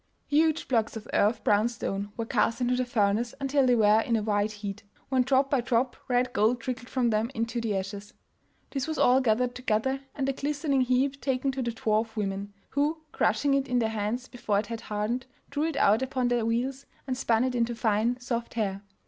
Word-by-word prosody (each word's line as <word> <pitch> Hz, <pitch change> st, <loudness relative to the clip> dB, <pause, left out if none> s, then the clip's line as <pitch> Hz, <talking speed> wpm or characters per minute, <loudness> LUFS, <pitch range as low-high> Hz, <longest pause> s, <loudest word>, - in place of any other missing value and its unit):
Huge 315 Hz, +2 st, +2 dB
blocks 225 Hz, -3 st, 0 dB
of 220 Hz, +1 st, -9 dB
earth 215 Hz, +2 st, +2 dB
brown 210 Hz, +2 st, +3 dB
stone 205 Hz, -3 st, -4 dB
were 230 Hz, -, -2 dB
cast 230 Hz, 0 st, +1 dB
into 250 Hz, 0 st, +1 dB
the 255 Hz, 0 st, 0 dB
furnace 220 Hz, +1 st, +1 dB
until 275 Hz, -1 st, +2 dB
they 250 Hz, -, +5 dB
were 215 Hz, -1 st, +5 dB
in 230 Hz, +1 st, 0 dB
a 215 Hz, -, 0 dB
white 205 Hz, 0 st, +1 dB
heat, 205 Hz, -2 st, -6 dB, 0.3 s
when 260 Hz, -1 st, +3 dB
drop 270 Hz, +2 st, +2 dB
by 275 Hz, -3 st, +3 dB
drop 245 Hz, +1 st, 0 dB
red 250 Hz, 0 st, +1 dB
gold 235 Hz, +1 st, +2 dB
trickled 245 Hz, +1 st, -5 dB
from 245 Hz, -3 st, +1 dB
them 215 Hz, +2 st, +1 dB
into 230 Hz, +1 st, -2 dB
the 215 Hz, -4 st, -1 dB
ashes. 200 Hz, +2 st, -6 dB, 0.6 s
This 275 Hz, 0 st, -2 dB
was 315 Hz, -, -3 dB
all 255 Hz, +2 st, +5 dB
gathered 245 Hz, +1 st, +1 dB
together, 250 Hz, +2 st, 0 dB, 0.2 s
and 275 Hz, -2 st, -1 dB
the 275 Hz, -, +1 dB
glistening 285 Hz, 0 st, 0 dB
heap 260 Hz, +2 st, +1 dB
taken 265 Hz, 0 st, 0 dB
to 265 Hz, 0 st, -3 dB
the 240 Hz, -, -1 dB
dwarf 220 Hz, -1 st, -1 dB
women, 200 Hz, -1 st, -3 dB, 0.2 s
who, 300 Hz, +3 st, 0 dB
crushing 275 Hz, +6 st, +2 dB
it 275 Hz, 0 st, +1 dB
in 250 Hz, -, +1 dB
their 225 Hz, -2 st, +2 dB
hands 220 Hz, +4 st, -2 dB
before 220 Hz, -5 st, -1 dB
it 205 Hz, -, 0 dB
had 230 Hz, +1 st, -6 dB
hardened, 220 Hz, +5 st, -2 dB, 0.2 s
drew 290 Hz, +2 st, 0 dB
it 320 Hz, -3 st, -2 dB
out 215 Hz, +4 st, +4 dB
upon 260 Hz, -2 st, 0 dB
their 240 Hz, -2 st, +1 dB
wheels, 255 Hz, +4 st, -1 dB, 0.2 s
and 260 Hz, -2 st, -2 dB
spun 230 Hz, -2 st, +2 dB
it 255 Hz, -1 st, 0 dB
into 235 Hz, -1 st, 0 dB
fine 225 Hz, +2 st, +1 dB
soft 235 Hz, -2 st, -4 dB
hair. 200 Hz, -3 st, -1 dB
240 Hz, 210 wpm, -28 LUFS, 215-260 Hz, 0.6 s, they